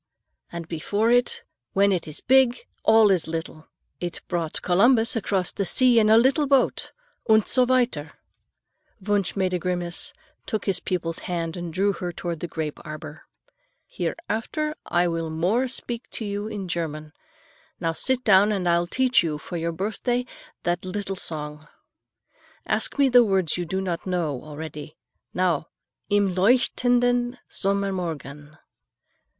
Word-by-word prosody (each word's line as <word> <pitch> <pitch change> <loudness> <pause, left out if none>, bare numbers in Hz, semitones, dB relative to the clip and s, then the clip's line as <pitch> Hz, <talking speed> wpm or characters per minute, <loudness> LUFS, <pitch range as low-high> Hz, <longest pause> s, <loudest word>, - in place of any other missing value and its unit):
And 170 -1 -6
before 205 +8 0
it, 245 0 +2 0.3
when 200 +1 +4
it 180 -4 -1
is 155 - -8
big, 260 -1 +3 0.2
all 220 -2 +6
is 180 -4 +1
little. 160 -1 -5 0.3
It 175 -1 -5
brought 170 -3 -2
Columbus 225 +6 +4
across 195 -4 0
the 200 - -2
sea 245 +4 +4
in 215 -1 +3
a 220 - +7
little 275 +5 +3
boat, 270 -2 +2 0.4
und 220 -1 +5
so 255 -1 +4
weiter." 240 -13 +1 0.9
Wunsch 200 -2 0
made 185 -2 0
a 180 - 0
grimace, 175 -1 -2 0.4
took 215 - -2
his 190 -3 +1
pupil's 170 -3 -2
hand 165 -2 -2
and 175 -2 -5
drew 195 +4 +1
her 175 0 -4
toward 170 -1 -5
the 175 - -4
grape 155 -3 -4
arbor. 155 0 -9 0.6
"Hereafter 305 - -3
I 175 0 +2
will 165 -1 -2
more 185 +11 +1
speak 240 -1 -5
to 225 - -4
you 205 +1 -3
in 205 -3 -5
German. 155 -3 -4 0.7
Now, 165 0 -1
sit 255 +8 0
down 205 -1 +5
and 190 -4 -1
I 170 0 +4
will 175 - -2
teach 260 +5 +3
you 160 -3 -2
for 160 - -8
your 170 0 -1
birthday 220 +7 -2 0.4
that 175 0 -1
little 195 +1 -4
song. 150 -3 -4 1.0
Ask - - 0
me 280 -1 +5
the 245 -1 +7
words 190 -6 +1
you 175 - -2
do 190 +3 -2
not 180 -2 -3
know 165 -8 -1
already. 155 0 -8 0.3
Now: 175 -4 0 0.4
Im 205 -2 +2
leuchtenden 245 +4 +2
Sommermorgen." 170 -7 -2
185 Hz, 150 wpm, -24 LUFS, 165-225 Hz, 1.0 s, a